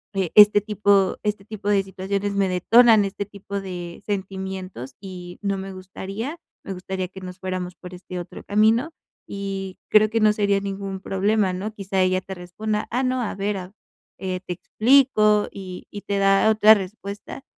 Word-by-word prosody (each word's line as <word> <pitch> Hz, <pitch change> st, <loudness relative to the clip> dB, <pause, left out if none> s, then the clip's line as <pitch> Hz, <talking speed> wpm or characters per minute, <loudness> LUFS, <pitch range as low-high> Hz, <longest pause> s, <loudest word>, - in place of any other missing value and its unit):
Eh, 190 Hz, -4 st, -1 dB
este 210 Hz, 0 st, +9 dB
tipo 200 Hz, -2 st, +2 dB
este 210 Hz, -2 st, -2 dB
tipo 210 Hz, -2 st, -5 dB
de 200 Hz, -1 st, +3 dB
situaciones 195 Hz, +1 st, -3 dB
me 195 Hz, -1 st, +2 dB
detonan 220 Hz, +4 st, +5 dB
este 195 Hz, +1 st, -4 dB
tipo 200 Hz, 0 st, -6 dB
de 175 Hz, -2 st, -7 dB
sentimientos, 190 Hz, -, -5 dB
y 180 Hz, -2 st, -9 dB
no 200 Hz, -1 st, -1 dB
me 195 Hz, 0 st, -6 dB
gustaría 195 Hz, -, -6 dB, 0.3 s
me 195 Hz, -, -5 dB
gustaría 185 Hz, 0 st, -4 dB
que 190 Hz, 0 st, -11 dB
nos 180 Hz, 0 st, -8 dB
fuéramos 185 Hz, -1 st, -4 dB
por 180 Hz, 0 st, -11 dB
este 180 Hz, 0 st, -7 dB
otro 175 Hz, -, -9 dB
camino", 220 Hz, +8 st, +2 dB, 0.4 s
y 195 Hz, -1 st, -5 dB
creo 215 Hz, 0 st, +5 dB
que 225 Hz, -, 0 dB
no 215 Hz, -1 st, +5 dB
sería 200 Hz, -1 st, +2 dB
ningún 195 Hz, -1 st, -5 dB
problema, 195 Hz, 0 st, +1 dB
¿no? 195 Hz, +4 st, -4 dB
Quizá 195 Hz, -2 st, -1 dB
ella 185 Hz, 0 st, +2 dB
te 190 Hz, +1 st, -8 dB
responda: 210 Hz, +4 st, -4 dB
"Ah 250 Hz, +3 st, 0 dB
no, 255 Hz, -1 st, 0 dB
a 220 Hz, -, -3 dB
ver 200 Hz, +1 st, -1 dB
a 185 Hz, 0 st, -7 dB, 0.5 s
eh, 185 Hz, -1 st, -3 dB
te 180 Hz, -, -3 dB
explico", 215 Hz, 0 st, +3 dB
y 185 Hz, -2 st, -9 dB
y 205 Hz, -, -7 dB
te 200 Hz, 0 st, -2 dB
da 195 Hz, +2 st, +4 dB
otra 215 Hz, 0 st, +7 dB
respuesta, 200 Hz, +5 st, -6 dB
195 Hz, 175 wpm, -23 LUFS, 185-210 Hz, 0.5 s, este